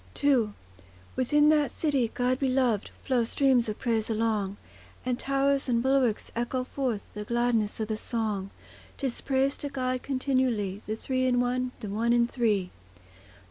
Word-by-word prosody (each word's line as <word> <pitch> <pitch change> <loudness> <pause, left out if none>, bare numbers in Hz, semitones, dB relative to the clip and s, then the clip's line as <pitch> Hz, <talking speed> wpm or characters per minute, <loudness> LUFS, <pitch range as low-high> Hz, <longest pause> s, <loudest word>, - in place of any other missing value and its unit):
II 245 -7 +3 0.6
Within 295 +4 +4
that 300 -3 +4
city, 275 -5 0
God 255 +1 +1
beloved, 255 -6 +1
Flow 250 -3 +2
streams 245 -1 +2
of 210 - -4
praise 225 -2 0
along; 215 -3 0 0.5
And 250 -1 -1
towers 275 0 +1
and 235 -1 +2
bulwarks 265 -5 +1
echo 240 +2 -1
forth 255 -5 -3
The 210 - -5
gladness 235 -2 0
of 220 - -1
the 215 -1 -2
song; 215 -4 -2 0.5
'Tis 265 -4 -3
praise 270 0 +1
to 285 - -4
God 255 -2 -2
continually, 255 -7 0
The 215 - -1
Three 255 +3 -1
in 245 -1 +3
One, 250 +1 0
the 215 - -5
One 230 +4 +1
in 240 0 +4
Three. 215 -7 0
245 Hz, 155 wpm, -28 LUFS, 220-265 Hz, 0.6 s, Within